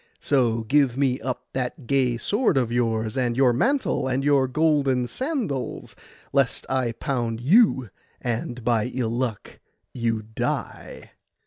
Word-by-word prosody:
So 120 -5 +1
give 135 +1 +2
me 135 -2 +1
up 125 -1 -4
that 130 +1 -4
gay 125 -2 +1
sword 205 - +1
of 120 -3 +1
yours, 115 -2 0
and 125 -2 0
your 130 -2 +4
mantle, 260 - +1
and 130 +1 0
your 140 -2 +3
golden 140 -3 +2
sandals, 235 - -3 0.4
lest 135 -5 +1
I 130 -3 0
pound 120 -3 -2
you, 135 - +4 0.3
and 120 0 -3
by 115 -2 +2
ill 120 -3 -1
luck 120 -4 -4 0.3
you 115 -3 -1
die. 110 +1 -5
125 Hz, 135 wpm, -24 LUFS, 120-140 Hz, 0.4 s, your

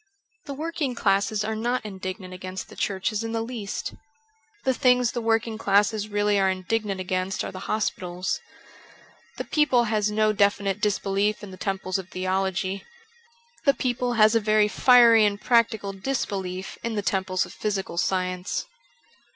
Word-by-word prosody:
The 280 - -5
working 305 -4 -3
classes 200 0 +1
are 220 +1 -2
not 240 +1 -1
indignant 190 -1 -6
against 185 +1 -7
the - - -12
churches 205 +2 -1
in 225 0 -4
the 225 0 -1
least. 225 -4 -5 0.7
The 260 - +2
things 250 -2 +3
the 240 - -3
working 225 0 0
classes 205 0 +2
really 205 -1 +1
are 190 -1 +3
indignant 195 +1 -2
against 185 +1 -2
are - - -5
the 185 - -8
hospitals. 185 -4 -2 1.0
The - - -3
people 270 -6 +3
has 215 -2 +1
no 215 0 +2
de 200 -1 +5
finite 200 0 -4
disbelief 205 0 0
in 200 - -8
the - - -9
temples 190 0 -2
of 190 -1 -9
theology. 190 +1 -1 0.8
The 280 -1 +5
people 245 -1 -1
has 215 -1 +5
a 230 - +4
very 215 -1 +3
fiery 235 -1 +6
and 205 -1 +1
practical 230 -4 +2
disbelief 190 -4 -3
in 230 -1 -3
the 205 - -1
temples 190 -1 0
of - - -12
physical 195 -5 -2
science. 185 0 -1
205 Hz, 160 wpm, -25 LUFS, 190-225 Hz, 1.0 s, fiery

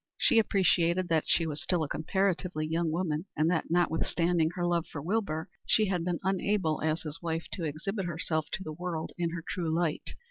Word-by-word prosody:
She 235 -5 +4
appreciated 180 -3 +2
that 160 -2 +2
she 165 - +3
was 155 -2 -3
still 175 -3 +1
a - - -2
comparatively 180 0 0
young 165 +1 0
woman, 160 0 -1
and 155 +3 +3
that, 165 - 0
notwithstanding 170 0 +2
her 175 - -1
love 170 -1 +1
for 145 - -5
Wilbur, 165 -1 -1 0.2
she 215 -3 +4
had 180 -3 0
been 175 -1 -1
unable 190 -3 +1
as 155 +1 0
his 155 +1 -6
wife 165 -1 -2
to 170 - -3
exhibit 175 +6 -3
herself 160 -2 -1
to 190 - -2
the 155 - -5
world 170 -1 -4
in 170 -1 +1
her 165 0 -5
true 170 -3 -2
light. 160 -1 -1
170 Hz, 200 wpm, -30 LUFS, 160-180 Hz, 0.2 s, She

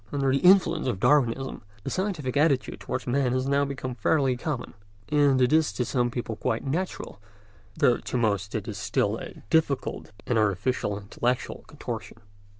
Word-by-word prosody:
Under 140 -2 +1
the 135 - +2
influence 180 -4 +5
of 115 -7 -1
Darwinism 135 0 +2 0.2
the - - -4
scientific 180 -10 -2
attitude 145 -3 +2
towards 130 - -4
man 125 0 +1
has 130 +1 0
now 140 +1 +2
become 130 -2 -4
fairly 135 0 +2
common, 130 0 -4 0.4
and 145 -3 +4
is 160 -6 +4
to 120 +4 -1
some 120 -1 +1
people 120 -2 -4
quite 115 +2 -2
natural, 155 - -3 0.6
though 120 - +4
to - - -4
most 100 -4 0
it 110 0 -3
is 105 -3 -5
still 105 +1 0
a - - -10
difficult 160 -8 0
and 120 -2 +1
artificial 105 +1 0
intellectual 120 +5 -2
contortion. - - -7
130 Hz, 160 wpm, -26 LUFS, 115-145 Hz, 0.6 s, influence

